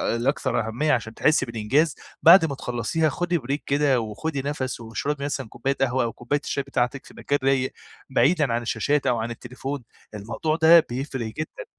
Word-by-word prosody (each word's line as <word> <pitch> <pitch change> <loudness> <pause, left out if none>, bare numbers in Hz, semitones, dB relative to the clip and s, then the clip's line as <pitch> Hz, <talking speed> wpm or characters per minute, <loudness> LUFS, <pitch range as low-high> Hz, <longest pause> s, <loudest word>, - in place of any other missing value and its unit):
الأكثر 120 -1 0
أهمية 150 +7 0
عشان 110 -2 -1
تحسي 150 -1 +2
بالإنجاز، 115 +7 +1 0.3
بعد 170 +2 +8
ما 150 -4 -1
تخلّصيها 125 +5 -1
خدي 175 +4 -1
بريك 140 +1 -3
كده، 140 -3 +2
وخدي 135 +7 -4
نفس، 135 -4 -3
واشربي 140 +5 -3
مثلًا 135 -4 -3
كوباية 135 +4 -2
قهوة 130 -1 +2
أو 115 - -2
كوباية 145 +4 -2
الشاي 140 - -1
بتاعتِك 130 0 -2
في - - -15
مكان 145 - 0
رايق 135 -1 +1 0.4
بعيدًا 140 +1 +3
عن 120 +1 0
الشاشات 140 +5 0
أو 120 -2 +2
عن 115 +1 -3
التليفون، 125 +4 -6 0.3
الموضوع 115 +10 -2
ده 165 +1 +7
بيفرق 130 -1 -3
جدًا. 155 - -6
135 Hz, 175 wpm, -24 LUFS, 120-150 Hz, 0.4 s, بعد